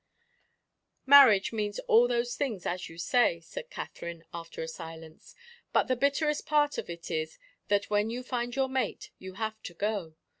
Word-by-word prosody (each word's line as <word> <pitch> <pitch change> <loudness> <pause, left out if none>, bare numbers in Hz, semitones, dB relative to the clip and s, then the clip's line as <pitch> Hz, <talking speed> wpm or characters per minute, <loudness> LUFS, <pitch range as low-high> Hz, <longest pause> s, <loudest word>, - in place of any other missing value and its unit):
"Marriage 265 -8 +7
means 210 -2 -2
all 235 +2 +5
those 240 0 0
things, 225 -10 -3
as 180 +1 -3
you 165 - -12
say," 170 0 +2
said - - -9
Katherine, 170 - -7
after 170 -1 -6
a - - -5
silence; 160 0 -10 0.4
"but - - +3
the 255 - +2
bitterest 285 +3 0
part 295 -1 +2
of - - -7
it 170 0 -7
is 155 0 -3 0.3
that, 205 0 +1
when 210 +1 +2
you 245 +2 -4
find 245 -1 -3
your 270 -1 +1
mate, 260 0 -3
you 190 0 -9
have 220 +1 -4
to 175 - -9
go. 200 -5 -2
215 Hz, 175 wpm, -29 LUFS, 170-255 Hz, 0.4 s, Marriage